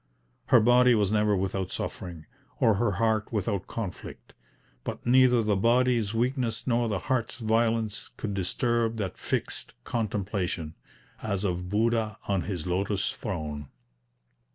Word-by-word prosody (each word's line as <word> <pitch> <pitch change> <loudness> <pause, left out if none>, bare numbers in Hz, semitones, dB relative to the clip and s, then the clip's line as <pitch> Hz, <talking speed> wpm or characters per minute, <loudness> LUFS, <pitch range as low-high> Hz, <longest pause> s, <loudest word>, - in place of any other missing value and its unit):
Her 125 - +7
body 120 +2 +5
was 105 -2 +2
never 105 -1 +3
without 95 0 -2
suffering, 85 -4 -5 0.3
or 110 - +5
her 105 +1 +1
heart 110 +2 +1
without 100 -3 -1
conflict; 105 -6 -7 0.5
but - - -6
neither 125 -1 +5
the 105 -1 +2
body's 115 0 +3
weakness 120 0 -1
nor 120 -2 +1
the 105 - 0
heart's 120 +3 -1
violence 115 -2 0
could 105 -2 -3
disturb 115 +4 0
that 100 -4 -4
fixed - - -3
contemplation, 100 -7 -2 0.5
as 100 -3 -2
of 90 -2 -2
Buddha 110 0 +1
on 100 -2 +1
his 90 -6 -4
lotus 100 +3 0
throne. 75 - -5
105 Hz, 130 wpm, -28 LUFS, 95-115 Hz, 0.5 s, Her